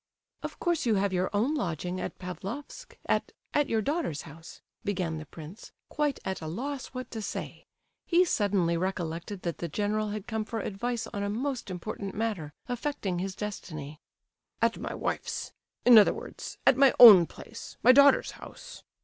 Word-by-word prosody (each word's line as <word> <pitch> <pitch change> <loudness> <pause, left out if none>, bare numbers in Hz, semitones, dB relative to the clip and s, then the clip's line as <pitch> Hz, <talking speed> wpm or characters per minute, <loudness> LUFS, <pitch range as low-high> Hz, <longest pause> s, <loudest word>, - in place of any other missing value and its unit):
"Of - - -7
course 345 -7 0
you 220 - +3
have 195 0 +1
your 185 +1 +1
own 225 +9 +1
lodging 180 - -2
at - - -5
Pavlofsk 230 - -7
at—at 290 -1 -1
your 220 -1 +1
daughter's 285 - -2
house," 165 0 -12 0.2
began 180 -5 -2
the 155 - -9
prince, 165 +9 -11 0.2
quite 295 -2 -1
at 190 -2 -3
a 160 - -5
loss 260 - -4
what 255 -1 -7
to 220 - -5
say. 200 - -6 0.4
He 355 +1 +5
suddenly 195 - +1
recollected 180 +1 -3
that 170 -2 -3
the 170 - -3
general 210 +5 -1
had 205 -1 -5
come 220 -1 -2
for 225 +1 -4
advice 235 +5 -3
on 200 - -3
a 200 - -1
most 250 +2 -3
important 195 +2 -5
matter, 205 -9 -2 0.2
affecting 245 -8 -2
his 190 +1 -3
destiny. 155 -8 -6 0.6
"At - - +1
my - - -4
wife's; - - -3 0.3
in 240 -2 +10
other 205 - +4
words, - - -8
at 260 - +6
my 275 -1 +5
own 200 -9 +11
place, - - -11
my 250 - +9
daughter's 280 +2 +6
house." - - -11
205 Hz, 170 wpm, -29 LUFS, 180-245 Hz, 0.6 s, own